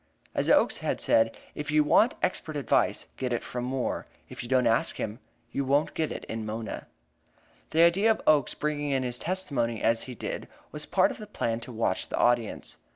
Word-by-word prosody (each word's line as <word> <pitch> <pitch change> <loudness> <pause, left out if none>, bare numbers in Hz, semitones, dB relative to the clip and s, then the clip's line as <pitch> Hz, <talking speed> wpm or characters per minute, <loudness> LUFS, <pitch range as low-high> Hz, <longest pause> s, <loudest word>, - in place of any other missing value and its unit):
As - - 0
Oakes - - +4
had - - -1
said: 115 0 +3 0.2
"If 150 0 -5
you 150 0 +4
want 215 +10 +4
expert 165 -4 -1
evidence, 135 -6 +1
get 130 -1 -2
it 120 - -1
from 125 0 -4
Moore; 130 0 -2 0.2
if - - -7
you 120 - -7
don't 130 -1 +3
ask 115 -1 +2
him, 110 +3 -4 0.3
you 140 - -1
won't 140 +3 +2
get 160 -1 -1
it - - -6
in 110 0 -4
Mona." 110 0 -5 0.8
The 165 +1 +4
idea 190 +6 +5
of 220 - +3
Oakes 150 -4 +4
bringing 145 -1 -2
in 135 -2 +1
his 125 -1 -1
testimony 140 - -1
as 115 0 +3
he 125 - -7
did - - -5 0.2
was - - -4
part - - +3
of - - -9
the - - -8
plan 115 0 -2
to 120 - -9
watch 110 -5 -1
the - - -2
audience. 120 -2 +1
130 Hz, 205 wpm, -28 LUFS, 115-150 Hz, 0.8 s, idea